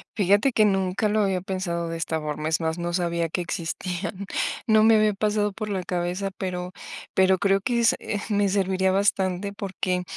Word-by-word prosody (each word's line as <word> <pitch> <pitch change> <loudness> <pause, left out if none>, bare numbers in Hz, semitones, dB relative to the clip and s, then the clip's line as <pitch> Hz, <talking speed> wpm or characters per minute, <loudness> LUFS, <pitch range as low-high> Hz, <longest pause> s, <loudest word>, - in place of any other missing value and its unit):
Fíjate 205 +6 +3
que 215 -3 +4
nunca 195 +1 +1
lo 215 +1 +1
había 190 -3 +1
pensado 175 -3 -3
de 165 - -4
esta 160 -1 -2
forma, 150 0 -3
es 160 - +1
más, 160 0 -2
no 175 0 -2
sabía 170 -1 0
que 180 - -2
existían. 180 +3 -4 0.4
No 220 -2 +5
me 225 0 +6
había 215 -1 +3
pasado 210 0 0
por 215 +1 -5
la 190 -3 -2
cabeza, 180 +2 -2
pero 180 -1 -3 0.4
pero 190 0 +4
creo 195 +1 +2
que 240 +2 0
es, 230 - +5
eh, 205 - -3
me 205 -1 +2
serviría 190 -1 +1
bastante 195 0 0
porque 190 -3 -2
190 Hz, 190 wpm, -25 LUFS, 175-205 Hz, 0.4 s, me